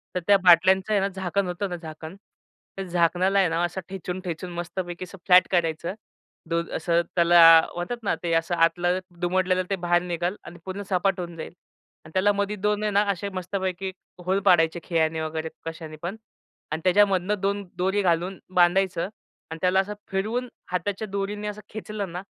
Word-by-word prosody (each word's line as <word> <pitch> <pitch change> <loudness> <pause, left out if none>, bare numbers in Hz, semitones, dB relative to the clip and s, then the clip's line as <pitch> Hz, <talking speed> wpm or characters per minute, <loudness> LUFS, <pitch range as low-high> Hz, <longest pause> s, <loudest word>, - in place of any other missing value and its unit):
तर - - +1
त्या 200 -1 +7
बाटल्यांचं 185 +3 +5
आहे 205 - +4
ना, 195 - +1
झाकण 190 0 -2
होतं 180 +2 -3
ना 175 - -3
झाकण, 160 +1 -9 0.6
त्या 195 0 -5
झाकणाला 180 +3 +2
आहे 185 - +4
ना 165 +2 0
असं 175 +2 -2
ठेचून-ठेचून 180 -2 -5
मस्तपैकी 175 +1 -5
असं 190 +2 -10
फ्लॅट 180 -1 +6
करायचं. 170 0 0 0.6
दो 170 0 +1
असं 170 +1 +1
त्याला 170 0 +6 0.3
म्हणतात 175 +8 -3
ना - - +1
ते 170 - -1
असं 165 +2 +1
आतलं 175 +2 +2 0.2
दुमडलेलं 185 +1 +1
ते 195 - +1
बाहेर 175 0 +3
निघेल 175 +2 -2
आणि 175 0 -11
पूर्ण 190 +2 -5
सपाट 190 0 +1
होऊन 170 -1 -5
जाईल. 160 - -7 0.5
आणि 155 - -13
त्याला 195 +2 +3
मध्ये 200 +1 -1
2 210 0 +1
आहे 210 - 0
ना 200 +1 +4
असे 200 +2 -4
मस्तपैकी 185 0 -3 0.3
होल 190 +2 +2
पाडायचे 165 0 +4
खिळ्याने 160 -2 0
वगैरे 160 0 -3 0.2
कशानेपण 165 +3 -6 0.6
आणि 160 +1 -2
त्याच्यामधनं 195 +1 +3
2 200 +1 0
दोरी 190 +3 +1
घालून 180 +1 0 0.2
बांधायचं 180 0 +3 0.4
आणि 165 - -5
त्याला 185 +1 +3
असं 205 +2 -1 0.2
फिरवून 225 +6 -1 0.2
हाताच्या 195 +4 -2
दोरीने 200 +1 -3
असं 210 0 -6
खेचलं 210 -3 -5
ना, 180 +1 -5
185 Hz, 170 wpm, -25 LUFS, 170-195 Hz, 0.6 s, त्या